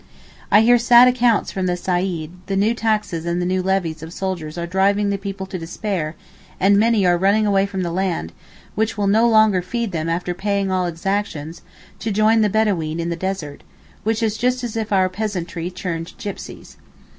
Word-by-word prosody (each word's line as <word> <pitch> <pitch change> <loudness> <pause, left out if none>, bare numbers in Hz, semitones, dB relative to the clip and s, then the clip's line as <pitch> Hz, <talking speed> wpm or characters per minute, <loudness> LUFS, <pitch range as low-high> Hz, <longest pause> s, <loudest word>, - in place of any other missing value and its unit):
I 210 - +6
hear 240 +2 +5
sad 240 +1 +7
accounts 245 -3 +2
from 190 -1 -2
the 180 0 0
Saeed: 175 -3 -2 0.2
the 195 - -1
new 205 +4 +2
taxes 215 -7 -1
and 170 +1 0
the 175 - -1
new 185 +1 0
levies 180 -4 -1
of 160 0 -8
soldiers 175 -4 -4
are 170 - -2
driving 200 +3 +1
the 200 - -1
people 195 -1 -5
to 190 -1 -6
despair 165 -2 -3 0.4
and 195 +2 +4
many 220 -3 +3
are 175 -1 +3
running 200 +3 +3
away 200 -1 +2
from 190 -2 -3
the 170 - -2
land, 175 - -2 0.4
which 220 +1 -1
will 205 - 0
no 220 +4 +4
longer 215 -4 +4
feed 230 +4 -3
them 165 -1 -2
after 175 +1 -1
paying 200 +1 -1
all 185 -1 +1
exactions, 170 -2 -3 0.4
to 225 - -3
join 215 +2 +3
the 210 - +3
Bedaween 185 -7 0
in 170 0 -2
the - - -1
desert, 170 -5 -4 0.4
which 225 +2 0
is 220 -1 0
just 250 +1 0
as 235 -2 -4
if 220 -1 -3
our 190 -2 +3
peasantry 180 -4 -4
turned 175 -2 -5
gipsies. 200 - -8
195 Hz, 195 wpm, -20 LUFS, 175-215 Hz, 0.4 s, sad